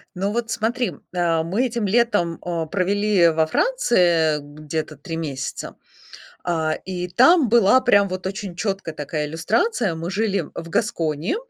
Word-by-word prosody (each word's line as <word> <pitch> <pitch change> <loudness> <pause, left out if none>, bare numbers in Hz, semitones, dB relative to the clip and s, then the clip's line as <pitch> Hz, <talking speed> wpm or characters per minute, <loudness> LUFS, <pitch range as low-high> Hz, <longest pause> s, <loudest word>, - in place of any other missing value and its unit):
Ну, 195 +3 -1
вот 230 -1 -2
смотри. 235 +2 -1 0.2
А, 165 -2 +1
мы 210 +10 0
этим 230 -3 -2
летом, 205 -6 +1
а, 170 -2 -3
провели 200 0 +2
во 160 -1 +2
Франции 175 - +2
где-то 155 +1 -6
3 165 +4 -7
месяца. 140 -4 -5 0.7
А, 160 -3 0
и 180 -1 -4
там 260 - +5
была 235 +1 +5
прям 200 -4 +4
вот 185 0 -4
очень 195 -2 -6
чёткая 195 -4 -3
такая 150 0 -3
иллюстрация. 195 - 0
Мы 165 +3 -5
жили 200 0 0
в 170 0 -7
Гаскони. 165 - -1
180 Hz, 145 wpm, -22 LUFS, 165-220 Hz, 0.7 s, там